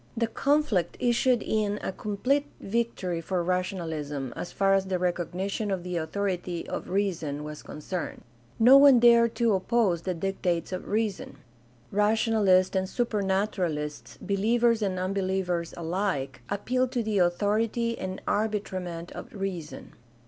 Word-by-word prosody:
The 230 - +2
conflict 235 - +1
issued 245 0 +2
in 210 -1 0
a - - -2
complete 250 +9 -1
victory 195 -6 -2
for 180 +1 -1
rationalism, 160 -7 -2
as - - -5
far 195 0 +2
as 195 -1 +2
the 185 -1 0
recognition 180 +4 -2
of 190 -3 -2
the 180 -1 -3
authority 175 +1 -3
of - - -5
reason 170 -7 -1
was 150 0 -7
concerned. 170 +4 -6 0.3
No 250 +4 +8
one 275 -3 +8
dared 235 -1 +5
to 235 -3 +2
oppose 190 -2 +1
the 185 +1 -2
dictates 180 -1 -1
of 185 - -5
reason. 210 -2 -2 0.5
Rationalists 210 -3 +3
and 190 0 0
Supernaturalists, 190 - -1
believers 230 +3 +2
and 190 -3 -1
unbelievers 185 -2 -1
alike, 170 -4 -2
appealed 255 +5 0
to 240 -3 0
the 215 -2 0
authority 215 +6 +1
and 185 0 -5
arbitrament 185 -5 -2
of - - -9
reason. 190 -6 -5
195 Hz, 135 wpm, -27 LUFS, 175-220 Hz, 0.5 s, No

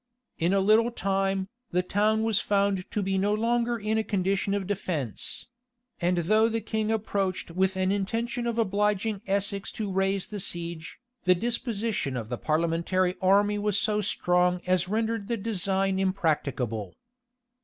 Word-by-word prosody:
In 170 +2 +2
a 195 - +3
little 215 +4 +4
time, 195 -3 -1 0.2
the 180 +1 +1
town 215 +4 +2
was 225 -2 +2
found 200 -2 0
to 210 - -1
be 190 0 0
no 205 +2 +2
longer 235 +2 +1
in 220 +1 0
a - - 0
condition 195 0 0
of 200 -2 -2
defence; 160 - -3 0.5
and 175 0 +1
though 220 +4 +4
the 225 0 -1
king 220 0 -2
approached 200 -5 -1
with 190 +2 +1
an 185 0 +1
intention 230 +5 -1
of 235 -1 -2
obliging 210 -1 +1
Essex 200 0 -1
to 210 -3 -3
raise 195 0 +1
the 210 - -6
siege, 170 -2 -4 0.3
the 180 0 +5
disposition 225 - -2
of 115 -2 -5
the 120 - -3
parliamentary 170 +3 +1
army 205 +2 +3
was 205 -1 +1
so 210 -1 +1
strong 180 -3 +2
as 180 0 +1
rendered 220 -1 -1
the 235 0 -1
design 195 -2 0
impracticable. 145 - -1
195 Hz, 155 wpm, -27 LUFS, 185-215 Hz, 0.5 s, the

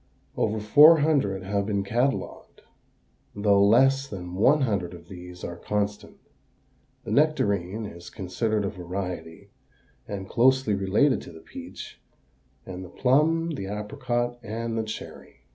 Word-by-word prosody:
Over 110 0 0
four 150 +9 +7
hundred 135 -12 +1
have 100 +1 -1
been 100 -2 0
catalogued, 120 +7 -2 0.7
though 100 -1 +3
less 135 +6 +4
than 90 -6 -7
one 130 +11 +4
hundred 100 -8 -1
of 85 0 -15
these 90 -1 -10
are 85 - -5
constant. 105 +2 -3 0.9
The - - -6
nectarine 110 - +1
is 85 -3 -10
considered 105 +3 -2
a - - -1
variety 90 -3 -6 0.6
and 95 -2 -6
closely 130 -1 +3
related 100 +8 +2
to - - -11
the 80 - -12
peach - - -10 0.6
and 95 0 -7
the 90 - -10
plum, 155 - +2
the 100 -11 -5
apricot, 120 +3 -3
and 115 0 -4
the 115 - 0
cherry. 110 - -9
105 Hz, 135 wpm, -26 LUFS, 95-130 Hz, 0.9 s, four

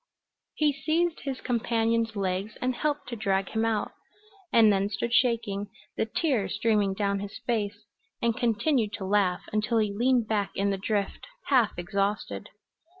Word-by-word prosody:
He 300 -2 +2
seized 320 +4 0
his 270 -2 -4
companion's 230 -1 0
legs 195 +1 -2
and 255 0 0
helped 295 +2 -2
to 240 - -4
drag 195 -3 0
him 220 0 0
out, 220 -2 0 0.6
and 220 -3 +6
then 195 +1 +1
stood 225 +3 -2
shaking, 225 -5 +2 0.3
the 220 - 0
tears 245 - 0
streaming 205 -2 +2
down 200 -1 0
his 200 +1 -6
face, 210 -3 -2 0.3
and 235 -1 +1
continued 235 -1 +1
to 190 - -4
laugh 190 -2 +2
until 215 +2 +1
he 210 -2 +1
leaned 240 +1 +2
back 210 -3 0
in 200 0 +1
the 195 - -1
drift, 205 0 -2 0.2
half 250 -7 +4
exhausted. 200 +4 -2
220 Hz, 155 wpm, -28 LUFS, 200-235 Hz, 0.6 s, and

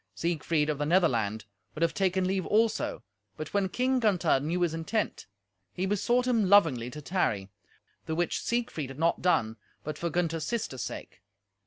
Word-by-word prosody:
Siegfried 165 -2 0
of 145 - -4
the 145 - 0
Netherland 115 - +2 0.3
would 160 - -1
have 165 - +2
taken 190 -2 +1
leave 190 0 -1
also, 220 - +1 0.3
but 155 0 -6
when 200 -2 +1
King 255 +5 +1
Gunther 180 - +3
knew 165 +6 -2
his 170 -2 +1
intent, 165 +7 -2 0.5
he 185 - -1
besought 235 +5 +1
him 230 -6 +2
lovingly 160 -12 +4
to 150 +4 -9
tarry, 105 - -1 0.6
the 160 - -1
which 175 +1 0
Siegfried 235 - -2
had 135 - -9
not 165 +2 +1
done 115 -11 +1 0.3
but 155 0 -5
for 170 - -1
Gunther's 165 -1 -1
sister's 215 - -3
sake. - - -7
170 Hz, 170 wpm, -29 LUFS, 150-200 Hz, 0.6 s, lovingly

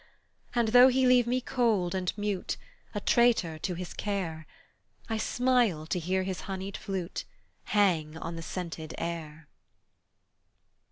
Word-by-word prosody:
And 235 -2 +2
though 245 +2 +8
he 260 0 +3
leave 250 -1 +5
me 250 +1 +1
cold 225 -9 +1
and 185 -1 0
mute, 205 -3 -2 0.4
A - - 0
traitor 215 -9 +3
to 180 +2 -2
his 180 +1 -6
care, 175 -7 -3 0.6
I 225 - -1
smile 240 -8 +2
to 180 +3 -1
hear 185 +3 0
his 185 -1 -4
honeyed 195 +1 -4
flute 190 -3 -4 0.4
Hang 165 -7 +2
on 165 +1 -5
the 165 - -5
scented 165 -2 -5
air. 160 -2 -5
190 Hz, 135 wpm, -29 LUFS, 170-230 Hz, 0.6 s, though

